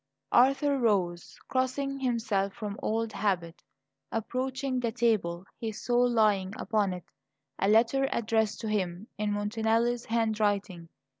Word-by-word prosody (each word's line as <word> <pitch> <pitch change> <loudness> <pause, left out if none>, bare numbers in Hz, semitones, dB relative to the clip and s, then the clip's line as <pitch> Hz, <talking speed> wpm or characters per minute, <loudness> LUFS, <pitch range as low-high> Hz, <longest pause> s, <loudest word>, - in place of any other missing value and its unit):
Arthur 275 +2 +4
rose, 185 -7 0
crossing 275 +2 -1
himself 220 -6 0
from 210 -2 -5
old 225 0 -1
habit. 175 -5 -1 0.5
Approaching 260 +3 -2
the 235 -2 -1
table, 215 -7 0
he 225 -1 -3
saw 240 +3 0
lying 215 -6 +3
upon 210 -3 0
it 180 -1 -6 0.5
a 195 - +2
letter 235 +6 +4
addressed 220 -2 0
to 225 - -4
him, 190 -2 -2
in 210 0 0
Montanelli's 225 +3 0
handwriting. 205 -6 0
220 Hz, 125 wpm, -29 LUFS, 200-240 Hz, 0.5 s, Arthur